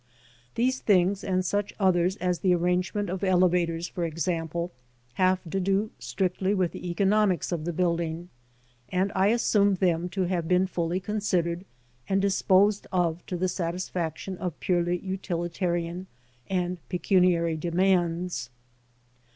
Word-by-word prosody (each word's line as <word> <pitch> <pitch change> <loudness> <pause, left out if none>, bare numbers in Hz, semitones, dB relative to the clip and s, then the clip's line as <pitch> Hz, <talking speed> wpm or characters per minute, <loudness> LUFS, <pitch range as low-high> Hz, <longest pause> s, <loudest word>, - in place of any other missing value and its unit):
These 255 +3 +1
things, 190 -1 +2
and 185 -1 0
such 205 +2 -1
others 185 -1 +3
as 180 -3 -1
the 180 -2 +3
arrangement 180 +4 0
of 185 +2 -4
elevators, 175 -2 +2
for 175 - -4
example, 170 +1 -2 0.4
have 185 +2 +2
to 195 - 0
do 195 +3 0
strictly 190 +1 -1
with 185 -3 +1
the 180 - -6
economics 195 +1 +2
of 165 -3 -2
the 175 - -1
building, 170 0 -1 0.6
and 190 +5 0
I 190 +1 +3
assume 205 -3 +3
them 175 -2 +1
to 190 +1 -1
have 175 -2 -1
been 180 +1 +3
fully 175 -1 -1
considered 185 -4 -1 0.4
and 195 0 +2
disposed 200 +1 +3
of 175 -2 0
to 180 - -3
the 185 +2 0
satisfaction 180 0 -3
of 175 -4 -4
purely 175 -1 +1
utilitarian 175 -1 -3 0.4
and 180 -1 -1
pecuniary 180 -3 +2
demands. 175 -4 0
180 Hz, 135 wpm, -27 LUFS, 170-190 Hz, 0.6 s, others